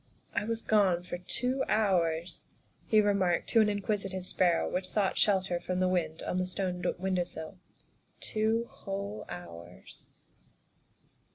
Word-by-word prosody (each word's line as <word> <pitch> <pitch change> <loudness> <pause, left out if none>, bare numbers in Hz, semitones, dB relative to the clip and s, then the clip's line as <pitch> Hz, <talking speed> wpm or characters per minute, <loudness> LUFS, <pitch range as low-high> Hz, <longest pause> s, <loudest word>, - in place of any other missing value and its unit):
" - - -37
I - - -4
was 225 0 -2
gone 190 -5 +3
for 180 0 -5
two 250 +8 -1
hours," 175 -5 +1 0.5
he 215 -1 +5
remarked 200 -4 +2
to 225 - +6
an 210 - +4
in 205 -1 -2
quisitive 195 -3 -2
sparrow 175 -2 +2
which 185 0 -2
sought 200 -3 +1
shelter 190 -4 +2
from 180 +1 -2
the 185 - +3
wind 175 -3 -1
on 180 - -2
the 185 0 0
stone 180 -1 -3
window 185 0 0
sill, 170 +2 -7 0.3
" - - -39
two 220 +1 0
whole 200 +1 -5
hours." 90 - -10
185 Hz, 155 wpm, -30 LUFS, 175-210 Hz, 0.5 s, to